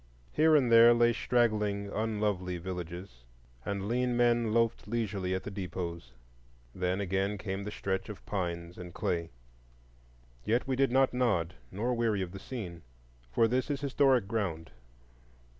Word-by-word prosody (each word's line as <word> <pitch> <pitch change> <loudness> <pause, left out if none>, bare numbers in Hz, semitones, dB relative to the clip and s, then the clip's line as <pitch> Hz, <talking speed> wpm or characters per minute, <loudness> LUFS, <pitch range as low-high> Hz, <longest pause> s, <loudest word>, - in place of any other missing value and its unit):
Here 155 +1 +4
and 130 -5 +3
there 115 +1 +8
lay 120 0 +4
straggling, 105 -4 +1
unlovely 105 -4 -1
villages, 90 -3 -6 0.5
and 100 +3 -3
lean 125 +1 0
men 120 -2 +3
loafed 115 -1 +1
leisurely 105 -5 -1
at 95 - -3
the 105 - -6
depots; 85 -8 -5 0.6
then 90 +1 -1
again 100 +1 0
came 95 -1 -4
the - - -3
stretch 95 -2 -3
of 105 - -9
pines 85 -3 -4
and 90 0 -9
clay. 85 -3 -1 1.1
Yet 120 +4 +1
we 130 - +1
did 135 -1 +2
not 135 0 +3
nod, 100 -9 +1 0.2
nor 115 +6 -1
weary 115 -5 +1
of 90 - -6
the 95 - -8
scene; 95 -9 -7 0.5
for 115 - +4
this 125 +5 0
is 140 -1 -2
historic 135 -5 +3
ground. 90 -8 -2
105 Hz, 150 wpm, -31 LUFS, 90-120 Hz, 1.1 s, there